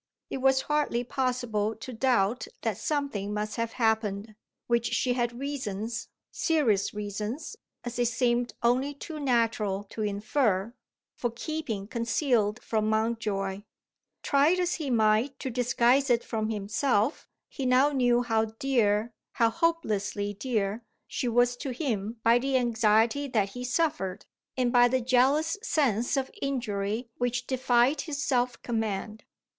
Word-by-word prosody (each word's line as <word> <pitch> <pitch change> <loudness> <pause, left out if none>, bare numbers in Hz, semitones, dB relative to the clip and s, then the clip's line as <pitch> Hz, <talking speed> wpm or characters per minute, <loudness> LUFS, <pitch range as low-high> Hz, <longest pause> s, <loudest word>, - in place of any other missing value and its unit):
It - - -2
was 265 0 +3
hardly 295 -5 0
possible 245 -5 -1
to 250 +4 -8
doubt 235 -2 +1 0.2
that 220 -5 -1
something 280 -10 -2
must 210 +2 -3
have 230 0 -2
happened, 220 -2 0 0.3
which 235 -1 +1
she 250 - +1
had 240 -1 -1
reasons 230 -5 -4 0.2
serious 260 - +1
reasons, 210 - -5 0.3
as 240 0 -5
it 240 - +3
seemed 240 0 0
only 260 +4 +2
too 310 +2 -7
natural 230 -7 +1
to 220 - -5
infer 210 0 0 0.4
for 240 - -2
keeping 235 -4 -4
concealed 230 -2 0
from 215 -1 0
Mountjoy. 215 -3 -1 0.6
Try 285 +3 +4
as 360 -1 0
he 285 - -2
might 225 +3 +2
to 260 - -4
disguise 250 +2 +2
it 240 -1 +3
from 220 -2 -2
himself, 215 +4 0 0.2
he 270 -3 -4
now 260 +3 +4
knew 245 -3 +3
how 225 -2 +1
dear, 225 -2 0 0.2
how 230 -3 +3
hopelessly 210 -10 -1
dear, 215 -1 -2 0.2
she 250 - -2
was 245 +1 +3
to 275 - -5
him 235 -5 -3
by 230 +1 +5
the 265 +1 +1
anxiety 230 +2 +2
that 215 -6 +1
he 245 +5 -7
suffered, 250 - -1 0.3
and 250 -2 +1
by 245 0 +7
the 260 +1 +1
jealous 270 - +2
sense 270 - +1
of 265 -1 -1
injury 230 -3 -2
which 245 0 -1
defied 255 +2 +2
his 290 -3 -4
self 250 -2 0
command. 220 -2 -3
240 Hz, 140 wpm, -28 LUFS, 215-265 Hz, 0.6 s, by